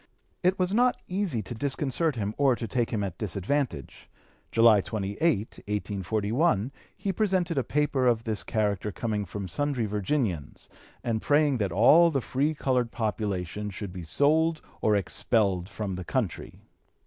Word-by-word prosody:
It 185 +1 +2
was 185 +1 +1
not 245 +3 +3
easy 180 - -1
to 95 - -5
disconcert 140 +4 -1
him 105 -2 -2
or 135 -3 +4
to 115 - -5
take 120 +2 0
him 105 -3 -1
at 95 -4 -5
disadvantage. 105 - -3 0.4
July 115 -3 +6
28, 100 -1 -4
1841, 105 - -1 0.3
he 195 - -2
presented 185 -6 +1
a - - 0
paper 145 -3 +1
of 115 -2 +2
this 110 -2 -2
character 105 -1 -1
coming 105 +1 -2
from 100 +1 -6
sundry 135 - -1
Virginians 105 - -2 0.3
and 115 -2 -1
praying 145 -3 +3
that 100 -3 0
all 145 - +6
the 140 -4 0
free 140 +5 -1
colored 125 -4 0
population 105 -4 -2
should 100 -2 -7
be 90 - -6
sold 155 - +2 0.2
or 105 - +3
expelled 95 -1 +1
from 105 -2 -4
the 90 0 -5
country. 105 -3 -3
115 Hz, 150 wpm, -27 LUFS, 100-145 Hz, 0.4 s, July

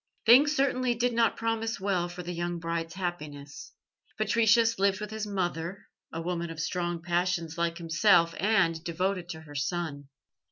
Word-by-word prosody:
Things 280 +6 +7
certainly 255 -3 +1
did 240 +1 0
not 230 -1 +2
promise 225 -1 -2
well 190 -3 0
for 175 +1 -7
the 175 +1 -5
young 175 0 -3
bride's 165 0 -4
happiness. 150 -6 -6 0.5
Patricius 225 +1 +3
lived 195 -1 +2
with 210 0 -6
his 215 -1 -4
mother, 180 -2 -3 0.2
a 165 - -5
woman 170 -1 -3
of 165 -1 -7
strong 175 0 -2
passions 175 -2 -1
like 170 0 -1
himself, 170 0 +3
and 180 -5 +2
devoted 180 +1 -2
to 160 -2 -6
her 150 -2 -13
son. 145 -1 -3
175 Hz, 160 wpm, -28 LUFS, 165-215 Hz, 0.5 s, Things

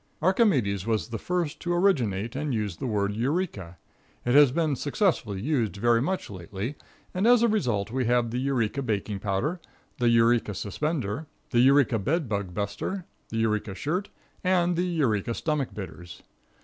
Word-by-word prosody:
Archimedes 140 - +2
was 110 0 0
the 115 -2 -4
first 175 -1 -2
to 175 - -3
originate 120 - +1
and 145 -2 -1
use 105 -6 -2
the 130 - -3
word 100 -2 0
"Eureka." 115 - -2 0.5
It 120 - +2
has 145 -2 +7
been 155 -1 +1
successfully 145 - 0
used 120 -6 0
very 115 +3 +3
much 185 +7 -1
lately, 100 - -5 0.4
and 190 +5 +1
as 245 -1 +6
a - - +5
result 120 - 0
we 130 0 0
have 120 -1 +2
the 125 - -1
Eureka 130 -1 0
baking 105 -4 -2
powder, 105 - -1 0.4
the 120 -1 +3
Eureka 115 -2 +3
suspender, 140 - -2 0.2
the 120 - +3
Eureka 130 -2 +5
bed 150 - 0
bug 100 -4 -2
buster, 105 - -3 0.2
the 115 - -4
Eureka 105 -3 0
shirt, 175 - -2 0.3
and 180 -1 +2
the 175 +2 +1
Eureka 120 - 0
stomach 150 -4 -1
bitters. 90 -4 -9
120 Hz, 160 wpm, -27 LUFS, 105-155 Hz, 0.5 s, has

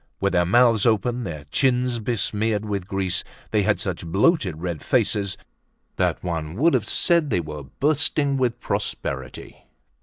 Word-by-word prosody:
With 100 0 0
their 90 -1 +2
mouths 115 +1 +4
open, 115 +3 +1
their 75 -5 -6
chins 125 -2 +1
besmeared 110 -1 -1
with 100 -3 -3
grease, 95 -1 0 0.3
they - - +3
had - - +1
such - - -3
bloated 95 - +1
red 85 -3 -4
faces 100 -3 0 0.6
that - - 0
one 80 -2 -3
would 160 +9 +3
have - - 0
said 170 -4 +2
they 90 - +1
were 75 -3 -6
bursting 145 -1 +2
with 125 -3 0
prosperity. - - -5
105 Hz, 150 wpm, -23 LUFS, 90-125 Hz, 0.6 s, mouths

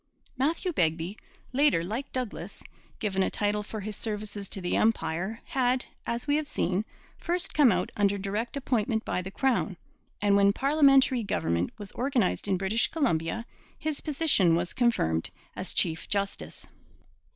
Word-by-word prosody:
Matthew 320 +7 0
Begbie, 165 - 0 0.4
later, 275 - +3
like 225 +10 -4
Douglas, 255 -4 -5 0.3
given 195 -3 -1
a - - +2
title 210 0 0
for 210 +1 -6
his 210 +1 -5
services 210 -2 -4
to - - -2
the 180 -1 -1
Empire, 195 0 0
had, 255 -1 +1 0.2
as 235 +1 -2
we 290 0 +2
have 305 -1 -2
seen, 190 - 0 0.3
first 355 +1 0
come 285 -6 +6
out 180 -1 0
under 200 -1 +2
direct 205 +6 -3
appointment 225 -4 0
by 180 - -1
the 185 - -6
crown; 225 -4 0 0.4
and 205 0 +3
when 200 0 +5
parliamentary 275 -2 +4
government 85 - 0
was 205 -2 -7
organized 245 -7 0
in 190 -2 +2
British 195 +5 +1
Columbia 230 - 0 0.3
his 310 -2 -3
position 280 - +3
was 170 +1 -1
confirmed 80 - +1 0.3
as - - -2
chief 160 -1 +1
justice. 200 -1 -2
215 Hz, 150 wpm, -28 LUFS, 190-260 Hz, 0.4 s, come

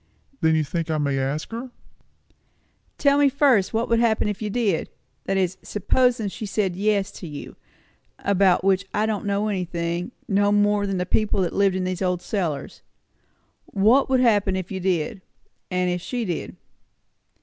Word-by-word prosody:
"Then 160 0 +3
you 155 - +2
think 165 +3 -3
I 155 - 0
may 140 -2 0
ask 140 +7 -2
her?" 235 +3 -5 1.3
"Tell 280 -1 +3
me 285 -1 +5
first, 265 -8 +3
what 225 +2 0
would 230 0 +2
happen 225 -2 +2
if 210 0 -3
you 215 - -2
did 205 -6 0 0.4
that 195 - 0
is, 190 0 0
supposin' 230 +2 +1
she 215 +2 -6
said 195 -3 -1
yes 200 0 +1
to 185 - -9
you, 150 -2 -8 0.6
about 190 -2 +2
which 195 0 +2
I 210 - +2
don't 215 -2 -2
know 200 +1 0
anything, 175 -1 -2 0.2
no 205 -1 +2
more'n 205 -1 +2
the 180 - -1
people 205 +1 +1
that 175 - -2
lived 195 -2 +2
in 185 - -1
these 185 0 -3
old 180 -2 0
cellars. 170 -9 -3 0.8
What 225 +8 +3
would 260 -1 +3
happen 205 -5 +3
if 185 0 -4
you 190 - -3
did? 185 -1 -1 0.5
and 180 -1 0
if 180 0 -2
she 245 +4 -3
did?" 175 -4 -4
195 Hz, 170 wpm, -23 LUFS, 180-215 Hz, 1.3 s, me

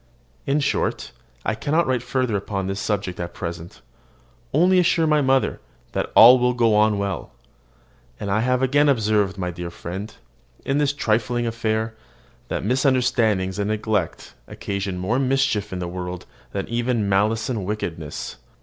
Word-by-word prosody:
In 140 +2 +2
short, 140 - -1 0.3
I - - +1
cannot 155 +9 +1
write 130 -2 0
further 125 -2 -1
upon 100 -1 -2
this 95 +1 -3
subject 100 -4 -2
at 85 0 -5
present; 85 -1 -7 0.7
only 180 +5 +4
assure 170 -2 +3
my 150 -1 +3
mother 135 -1 +2 0.3
that - - -2
all 125 +3 +9
will 125 0 +2
go 115 -2 +3
on 105 0 +3
well. 100 -10 -3 0.9
And 100 - -3
I 105 - +2
have 125 +2 +1
again 145 +3 +3
observed, 105 -6 +1
my 90 -2 -2
dear 85 0 -6
friend, 95 +5 -6 0.5
in 135 +2 +1
this 145 -1 +2
trifling 120 -2 0
affair, 110 -1 -1 0.5
that - - -3
misunderstandings 120 -6 +1
and 100 - 0
neglect 105 -4 -2
occasion 100 -2 -4
more 105 +8 0
mischief 135 -6 +1
in 95 - -4
the 90 -1 -3
world 90 0 -6 0.3
than 100 -1 -3
even 120 -2 0
malice 105 +3 +1
and 115 -6 -2
wickedness. 85 -7 -5
110 Hz, 155 wpm, -23 LUFS, 95-130 Hz, 0.9 s, all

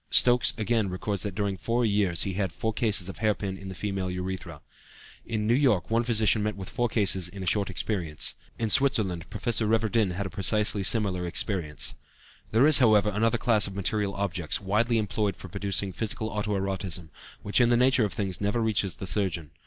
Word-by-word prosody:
" - - -44
Stokes, 125 0 +5
again, 110 -2 0
records 95 +1 -3
that 100 -3 -3
during 100 -1 -2
four 115 +5 0
years 100 -5 +1
he 95 - -3
had 95 -2 -2
four 110 +6 -3
cases 105 -5 0
of 95 - -7
hair 110 -2 +2
pin 95 -2 -4
in 95 0 -9
the 95 - -7
female 95 -1 -3
urethra. 90 0 -5 0.7
In 110 -2 -2
New 115 - +3
York 125 -8 +2
one 115 +1 +2
physician 110 -2 +2
met 105 0 -2
with 95 -2 -8
four 120 -1 -1
cases 95 -5 +2
in 95 +1 -8
a - - -5
short 100 +1 +1
experience. 85 -8 -2 0.2
In 110 -2 -1
Switzerland 110 -11 +2
Professor 110 +2 -2
Reverdin 110 -3 +1
had 100 +3 -3
a 95 - -6
precisely 105 +1 +2
similar 95 -4 +1
experience. 85 -3 -1 0.6
There 115 +5 +4
is, 155 -1 +7
however, 105 -4 +4
another 115 +3 +1
class 110 -4 +3
of 95 - -8
material 100 0 -1
objects, 90 -5 -2
widely 110 +4 +1
employed 105 -1 -1
for 95 - -11
producing 100 +1 -2
physical 110 +1 -3
auto 105 -1 -2
erotism, 95 -3 -3 0.3
which 105 +5 +2
in 120 - +4
the 120 - +4
nature 125 -1 +4
of 105 - -1
things 95 -3 -3
never 105 +3 0
reaches 105 -4 0
the - - -7
surgeon. 90 -6 -2
105 Hz, 200 wpm, -27 LUFS, 95-110 Hz, 0.7 s, is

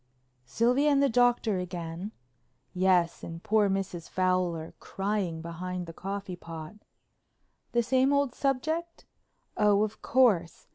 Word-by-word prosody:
"Sylvia 250 - +2
and 280 -1 +4
the 280 - +4
Doctor 240 -4 +2
again?" 175 +1 -5 0.6
"Yes, 180 -2 +2
and 165 0 -7
poor 215 -1 +3
Mrs. 190 -3 -3
Fowler 180 -3 0
crying 195 -5 -2
behind 180 +2 -5
the 165 - -9
coffee 195 0 -5
pot." 165 -1 -9 1.0
"The 240 0 +3
same 260 +3 +3
old 280 -3 +2
subject?" 315 +6 -2 0.5
"Oh, 210 0 +4
of 215 0 -4
course. 205 -10 +2
195 Hz, 125 wpm, -28 LUFS, 175-245 Hz, 1.0 s, and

